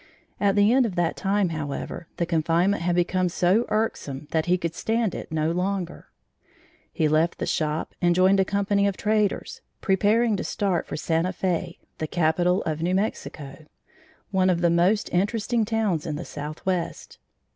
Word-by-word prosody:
At 200 Hz, -1 st, +2 dB
the 205 Hz, +3 st, +4 dB
end 260 Hz, -2 st, +4 dB
of 190 Hz, -, -6 dB
that 175 Hz, -2 st, 0 dB
time, 195 Hz, -1 st, +1 dB
however, 155 Hz, +1 st, -5 dB
the 170 Hz, -, 0 dB
confinement 170 Hz, +4 st, +1 dB
had 175 Hz, 0 st, +1 dB
become 180 Hz, +1 st, +1 dB
so 185 Hz, +6 st, +2 dB
irksome 150 Hz, -10 st, -2 dB
that 160 Hz, 0 st, 0 dB
he 180 Hz, +1 st, +3 dB
could 170 Hz, -2 st, -3 dB
stand 225 Hz, +1 st, 0 dB
it -, -, -7 dB
no 160 Hz, 0 st, 0 dB
longer. 180 Hz, 0 st, -3 dB, 0.8 s
He 155 Hz, -, +1 dB
left 155 Hz, +3 st, +2 dB
the -, -, -2 dB
shop 155 Hz, 0 st, -1 dB
and 175 Hz, -1 st, +3 dB
joined 190 Hz, +2 st, +4 dB
a -, -, +5 dB
company 200 Hz, 0 st, +1 dB
of 195 Hz, -, -2 dB
traders, 210 Hz, -1 st, 0 dB, 0.2 s
preparing 215 Hz, +3 st, +2 dB
to -, -, -3 dB
start 190 Hz, -5 st, -1 dB
for -, -, -4 dB
Santa 165 Hz, +3 st, 0 dB
Fe, 180 Hz, -1 st, -2 dB, 0.2 s
the 155 Hz, -, -2 dB
capital 175 Hz, +3 st, +1 dB
of 155 Hz, -1 st, -3 dB
New 180 Hz, +2 st, +1 dB
Mexico, 155 Hz, -7 st, -4 dB, 0.6 s
one 190 Hz, -1 st, +3 dB
of 175 Hz, -2 st, +1 dB
the 170 Hz, -1 st, +3 dB
most 180 Hz, +5 st, +2 dB
interesting 215 Hz, +4 st, +1 dB
towns 210 Hz, -8 st, 0 dB
in 155 Hz, -, -2 dB
the 170 Hz, -, -5 dB
southwest. 155 Hz, +4 st, -4 dB
180 Hz, 170 wpm, -25 LUFS, 165-200 Hz, 0.8 s, a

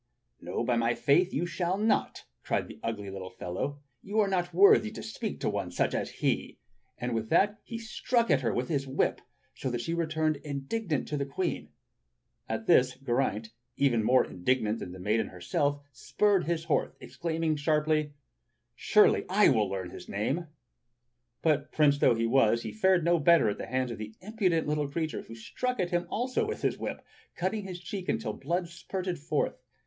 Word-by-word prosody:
"No, -, -, -3 dB
by 120 Hz, -2 st, +1 dB
my 115 Hz, +1 st, +2 dB
faith 180 Hz, +6 st, +3 dB
you 160 Hz, +5 st, -1 dB
shall 175 Hz, +1 st, -1 dB
not," 215 Hz, +2 st, 0 dB, 0.2 s
cried -, -, -1 dB
the -, -, -11 dB
ugly 105 Hz, -4 st, -4 dB
little 95 Hz, -1 st, -6 dB
fellow. 140 Hz, +14 st, -5 dB, 0.2 s
"You 210 Hz, +2 st, -2 dB
are 210 Hz, -, +4 dB
not 180 Hz, -2 st, 0 dB
wwthy 180 Hz, -, +6 dB
to -, -, -6 dB
speak -, -, -5 dB
to -, -, 0 dB, 0.2 s
such -, -, 0 dB
a -, -, 0 dB
one -, -, +1 dB
as -, -, -6 dB
he!" -, -, -1 dB, 0.4 s
And 125 Hz, 0 st, -3 dB
with 110 Hz, -1 st, -2 dB
that 205 Hz, +2 st, +3 dB
he 230 Hz, -, -6 dB
struck 230 Hz, +1 st, 0 dB
at 135 Hz, -, +4 dB
her 120 Hz, -, 0 dB
wdth 125 Hz, +1 st, -2 dB
his 140 Hz, -4 st, -1 dB
whip, 135 Hz, +2 st, 0 dB, 0.3 s
so 130 Hz, -, -4 dB
that 120 Hz, -1 st, -2 dB
she 165 Hz, -, -3 dB
returned 160 Hz, -2 st, 0 dB
indignant 145 Hz, -, -3 dB
to 150 Hz, -, -1 dB
the 140 Hz, -, -1 dB
Queen. 175 Hz, +6 st, -3 dB, 0.8 s
At 110 Hz, 0 st, -3 dB
this 125 Hz, +2 st, +4 dB
Geraint, 120 Hz, -4 st, -1 dB, 0.3 s
even 120 Hz, -6 st, +3 dB
more 130 Hz, +4 st, +4 dB
indignant 110 Hz, +3 st, 0 dB
than 90 Hz, -, -6 dB
the 95 Hz, -, -9 dB
maiden 105 Hz, +5 st, 0 dB
herself, 140 Hz, +11 st, -1 dB
spurred 185 Hz, +9 st, +1 dB
his 165 Hz, -1 st, -1 dB
horse, 165 Hz, -2 st, 0 dB
exclaiming 165 Hz, -2 st, -2 dB
sharply: 150 Hz, 0 st, +1 dB, 0.6 s
"Surely 210 Hz, -, +4 dB
I 205 Hz, +3 st, +5 dB
wall 110 Hz, -6 st, +2 dB
learn 95 Hz, -2 st, -4 dB
the -, -, -9 dB
name." 135 Hz, -, -2 dB, 1.0 s
But 150 Hz, -2 st, +1 dB
prince 145 Hz, -2 st, +3 dB
though 125 Hz, -, +5 dB
he 115 Hz, 0 st, 0 dB
was, 115 Hz, -1 st, +3 dB
he -, -, -4 dB
fared 190 Hz, -5 st, +3 dB
no 170 Hz, 0 st, +3 dB
better 160 Hz, -6 st, +5 dB
at 100 Hz, -, -4 dB
the -, -, -5 dB
hands 130 Hz, 0 st, -1 dB
of 115 Hz, -, -6 dB
the 110 Hz, 0 st, -7 dB
impudent 190 Hz, -6 st, 0 dB
little 150 Hz, -1 st, 0 dB
creature, 160 Hz, +1 st, -2 dB
who 115 Hz, -, -11 dB
struck 250 Hz, -, -3 dB
at 180 Hz, -1 st, 0 dB
him 175 Hz, 0 st, 0 dB
also 250 Hz, +3 st, 0 dB
with 440 Hz, -, -5 dB
his -, -, 0 dB
whip, -, -, -5 dB, 0.3 s
cutting 195 Hz, +3 st, -2 dB
his 180 Hz, -2 st, -6 dB
cheek 185 Hz, +1 st, -6 dB
until 110 Hz, -, -1 dB
the -, -, -12 dB
blood 175 Hz, +4 st, 0 dB
spurted 180 Hz, +1 st, -4 dB
forth. 150 Hz, -3 st, -1 dB
150 Hz, 195 wpm, -29 LUFS, 120-175 Hz, 1.0 s, wwthy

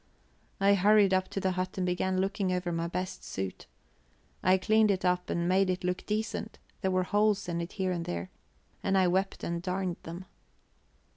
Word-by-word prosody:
I 200 Hz, +1 st, +5 dB
hurried 200 Hz, 0 st, +5 dB
up 185 Hz, 0 st, +2 dB
to -, -, -3 dB
the 190 Hz, -1 st, +1 dB
hut 185 Hz, +1 st, -3 dB
and 185 Hz, -, 0 dB
began 185 Hz, +1 st, 0 dB
looking 195 Hz, 0 st, 0 dB
over 180 Hz, -1 st, -1 dB
my 165 Hz, 0 st, -1 dB
best 185 Hz, +2 st, -4 dB
suit. 95 Hz, -1 st, -5 dB, 0.7 s
I 185 Hz, +1 st, +4 dB
cleaned 215 Hz, +3 st, +3 dB
it 190 Hz, -2 st, +1 dB
up 180 Hz, 0 st, +1 dB
and 170 Hz, 0 st, 0 dB
made 190 Hz, +1 st, +3 dB
it 185 Hz, 0 st, -1 dB
look 180 Hz, 0 st, -2 dB
decent; 215 Hz, +1 st, -2 dB, 0.2 s
there 190 Hz, -, +1 dB
were 185 Hz, 0 st, +2 dB
holes 205 Hz, +1 st, +2 dB
in 170 Hz, -1 st, -2 dB
it 170 Hz, -, -6 dB
here 190 Hz, -2 st, -1 dB
and 170 Hz, -2 st, -2 dB
there, 85 Hz, +1 st, -4 dB, 0.5 s
and 195 Hz, -, +1 dB
I 185 Hz, -1 st, +4 dB
wept 190 Hz, +2 st, 0 dB
and 170 Hz, 0 st, -2 dB
darned 185 Hz, -1 st, -2 dB
them. 170 Hz, +3 st, -8 dB
185 Hz, 195 wpm, -30 LUFS, 180-195 Hz, 0.7 s, I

